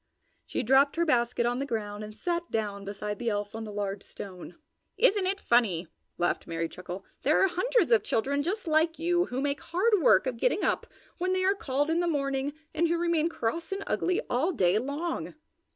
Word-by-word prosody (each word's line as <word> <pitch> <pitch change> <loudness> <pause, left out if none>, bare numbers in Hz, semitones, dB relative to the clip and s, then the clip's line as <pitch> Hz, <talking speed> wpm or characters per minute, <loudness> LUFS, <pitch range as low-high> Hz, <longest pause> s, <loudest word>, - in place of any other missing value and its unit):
She - - -2
dropped 270 +4 +4
her 340 +1 +2
basket 240 -5 +2
on 245 +1 0
the 275 - -1
ground 210 -3 -3
and 215 0 -9
sat 345 +4 -2
down 205 -3 -2
beside 205 +1 -4
the 240 -1 0
elf 205 -1 -2
on 225 0 -5
the 210 - -7
large 200 -1 -3
stone. 185 -3 -9 0.4
"Isn't 410 -5 +3
it 395 +1 0
funny?" 195 - +2 0.3
laughed 175 - 0
Merry 165 0 -2
Chuckle. 180 +2 -8 0.2
"There - - +3
are - - +6
hundreds 385 - +1
of 230 - +6
children 280 +5 0
just 380 +5 -3
like 320 +1 +2
you 350 +2 +2
who 255 -3 -3
make 285 +1 -1
hard 400 +3 +2
work - - +5
of 255 -3 -2
getting - - +1
up - - 0 0.3
when 370 +1 +1
they 370 0 +1
are 385 - +4
called 290 -6 -1
in 330 - +2
the 350 - +1
morning 275 -2 -1 0.2
and 330 +2 +2
who 340 +1 +1
remain 335 -1 +1
cross 330 +4 -3
and 395 +1 -2
ugly 360 - 0
all 270 +9 +1
day 195 - +2
long!" 290 +7 -3
280 Hz, 205 wpm, -28 LUFS, 215-340 Hz, 0.4 s, are